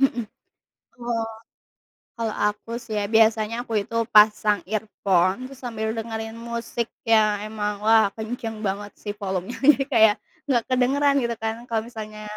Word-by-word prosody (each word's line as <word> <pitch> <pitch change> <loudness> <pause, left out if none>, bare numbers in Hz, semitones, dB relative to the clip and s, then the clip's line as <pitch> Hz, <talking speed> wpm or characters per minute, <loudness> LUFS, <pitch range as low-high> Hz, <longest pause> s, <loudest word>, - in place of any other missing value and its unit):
mhm. 245 -4 +2 0.7
Oh. 235 -2 -2 0.9
Kalau 225 -1 -1 0.2
aku 210 +2 -3
sih 230 -3 -7
ya, 205 - 0
biasanya 225 +2 +3
aku 225 - -4
itu 230 +3 -7 0.2
pasang 210 0 +5
earphone, 205 +1 0
terus 275 - -12
sambil 220 -3 -3
dengerin 225 0 -5
musik 235 0 -4 0.2
yang 215 -2 +3
emang 210 -1 -4
wah, 220 -1 +5
kenceng 225 -1 -5
banget 200 0 -3
sih, 205 - -3
volumenya. 190 +3 -3
Jadi 275 -1 +5
kayak 220 -4 +6 0.3
enggak 245 -4 +2
kedengeran, 275 +3 +3
gitu 235 0 -1
kan. 220 0 -1
Kalau 225 -2 -1
misalnya, 215 -2 -8
220 Hz, 145 wpm, -24 LUFS, 210-235 Hz, 0.9 s, kayak